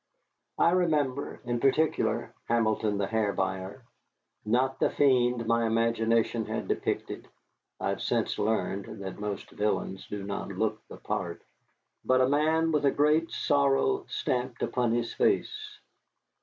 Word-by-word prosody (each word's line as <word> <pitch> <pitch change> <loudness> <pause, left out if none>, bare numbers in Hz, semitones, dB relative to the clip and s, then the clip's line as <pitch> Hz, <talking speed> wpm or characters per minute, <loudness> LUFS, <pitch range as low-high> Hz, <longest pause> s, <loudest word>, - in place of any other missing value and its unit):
I 170 - +4
remember, 150 -7 0
in 120 -1 -1
particular, 150 +5 +1
Hamilton 110 -2 +1
the 100 - 0
Hair 105 -1 0
Buyer. 95 +5 -3 0.6
Not 125 +5 +1
the - - +3
fiend 125 -4 +2
my 115 0 +2
imagination 115 0 +1
had - - -3
depicted - - -2 0.5
(I - - -1
have - - -2
since - - 0
learned 100 -1 -2
that 95 +1 -6
most 105 -1 -5
villains 105 -2 -2
do 105 -1 -5
not 100 0 -4
look - - -2
the - - -10
part), - - -4 0.6
but 130 0 +3
a 130 - +4
man 160 +3 +2
with 150 -2 +1
a 140 - +5
great 150 +4 +2
sorrow 140 - +2
stamped 125 -1 -2
upon 120 -2 0
his 120 0 -1
face. 430 -1 0
120 Hz, 140 wpm, -28 LUFS, 110-145 Hz, 0.6 s, a